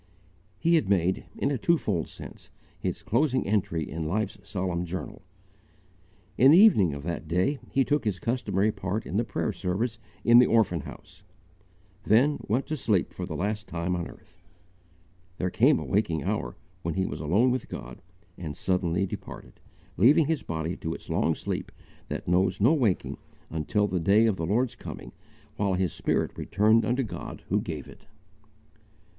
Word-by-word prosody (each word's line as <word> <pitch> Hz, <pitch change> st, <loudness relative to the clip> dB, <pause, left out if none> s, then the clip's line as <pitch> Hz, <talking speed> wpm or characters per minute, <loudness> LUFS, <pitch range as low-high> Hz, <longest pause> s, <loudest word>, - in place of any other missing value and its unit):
He 165 Hz, -, +2 dB
had 110 Hz, -11 st, -1 dB
made, 95 Hz, -1 st, +1 dB
in 140 Hz, -, 0 dB
a 135 Hz, -, -1 dB
twofold 110 Hz, -, +1 dB
sense, -, -, -11 dB, 0.3 s
his -, -, -3 dB
closing 130 Hz, +2 st, +1 dB
entry 90 Hz, -6 st, 0 dB
in 80 Hz, -1 st, -4 dB
life's 100 Hz, +3 st, -2 dB
solemn 95 Hz, -3 st, -3 dB
journal! 90 Hz, +2 st, -6 dB, 1.2 s
In 130 Hz, -, +8 dB
the 155 Hz, -, +8 dB
evening 105 Hz, -, +6 dB
of 70 Hz, -, -7 dB
that 85 Hz, 0 st, -4 dB
day 90 Hz, -, +1 dB
he 135 Hz, -1 st, +2 dB
took 150 Hz, 0 st, +1 dB
his 105 Hz, -5 st, -1 dB
customary 105 Hz, -1 st, 0 dB
part 100 Hz, +2 st, -3 dB
in 95 Hz, -, -3 dB
the 115 Hz, -, +2 dB
prayer 110 Hz, -, -2 dB
service 105 Hz, +6 st, -2 dB, 0.2 s
in 120 Hz, 0 st, +7 dB
the 125 Hz, -, +6 dB
orphan 110 Hz, -7 st, +3 dB
house -, -, -11 dB, 0.8 s
then 130 Hz, +8 st, +3 dB
went 120 Hz, +6 st, +1 dB
to 155 Hz, -, -3 dB
sleep 105 Hz, -8 st, 0 dB
for -, -, -5 dB
the -, -, -5 dB
last 105 Hz, +3 st, -2 dB
time 85 Hz, +1 st, -2 dB
on 85 Hz, -1 st, -3 dB
earth; -, -, -17 dB, 1.0 s
there 90 Hz, 0 st, -1 dB
came 135 Hz, +9 st, +4 dB
a -, -, -5 dB
waking 85 Hz, -7 st, 0 dB
hour, -, -, -2 dB, 0.3 s
when 85 Hz, -3 st, -3 dB
he 95 Hz, -, +1 dB
was -, -, -5 dB
alone 100 Hz, +12 st, +3 dB
with 125 Hz, -1 st, -3 dB
God, -, -, -8 dB, 0.4 s
and 75 Hz, -5 st, -6 dB
suddenly 90 Hz, 0 st, 0 dB
departed, -, -, -9 dB, 0.4 s
leaving 140 Hz, -, +6 dB
his 155 Hz, -1 st, 0 dB
body 80 Hz, +1 st, -3 dB
to 80 Hz, 0 st, -4 dB
its -, -, -9 dB
long 80 Hz, -, +1 dB
sleep -, -, -4 dB, 0.4 s
that -, -, -5 dB
knows 90 Hz, +1 st, +2 dB
no 120 Hz, +10 st, +5 dB
waking 120 Hz, -, 0 dB, 0.3 s
until 80 Hz, +7 st, 0 dB
the 95 Hz, -3 st, -1 dB
day 100 Hz, +6 st, +4 dB
of 110 Hz, -3 st, +2 dB
the 80 Hz, -, -2 dB
Lord's 120 Hz, +5 st, +1 dB
coming, 60 Hz, -, -9 dB, 0.5 s
while 100 Hz, -2 st, +1 dB
his 90 Hz, -1 st, 0 dB
spirit -, -, -1 dB
returned 110 Hz, +3 st, +3 dB
unto 125 Hz, +4 st, +1 dB
God 110 Hz, -, -7 dB
who -, -, +2 dB
gave -, -, -6 dB
it. -, -, -15 dB
100 Hz, 175 wpm, -27 LUFS, 85-120 Hz, 1.2 s, In